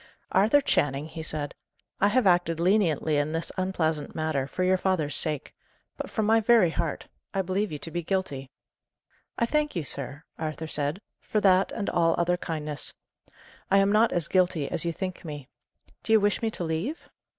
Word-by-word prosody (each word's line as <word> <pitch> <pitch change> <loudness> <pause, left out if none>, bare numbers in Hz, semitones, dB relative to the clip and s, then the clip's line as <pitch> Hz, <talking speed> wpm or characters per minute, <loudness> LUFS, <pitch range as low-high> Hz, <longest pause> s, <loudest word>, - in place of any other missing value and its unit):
"Arthur 215 +10 +4
Channing," 145 - +1
he 160 0 -7
said, 150 -2 -3 0.5
"I 200 - +4
have 235 +3 +2
acted 175 -3 +3
leniently 170 -5 +2
in 145 +2 0
this 165 +1 -3
unpleasant 160 -5 -1
matter, 155 -4 -1
for 185 +6 -2
your 185 +1 +4
father's 160 -7 0
sake; 150 -3 -1 0.4
but, - - -6
from 220 - -1
my 225 +1 +5
very 220 -6 +4
heart, 160 -2 -3 0.3
I 195 - +1
believe 190 +2 -1
you 150 - -4
to 165 - -8
be 175 - -2
guilty." 160 -7 -2 0.9
"I 235 - +2
thank 300 +2 0
you, 170 - -1
sir," 140 +2 -3 0.2
Arthur 155 0 -4
said, 150 +3 0 0.2
"for 215 - -1
that 190 -1 +4
and 205 - -3
all 165 -1 +2
other 175 +1 +2
kindness. 155 -4 -4 0.7
I 195 - +5
am 195 0 +4
not 215 +2 +4
as 170 -3 +1
guilty 180 -5 +2
as 165 - 0
you 170 - +1
think 185 +2 -5
me. 145 -5 -7 0.5
Do 220 - 0
you 220 - +7
wish 205 0 +1
me 225 - +1
to 200 - -4
leave?" 170 - -3
170 Hz, 185 wpm, -27 LUFS, 155-195 Hz, 0.9 s, you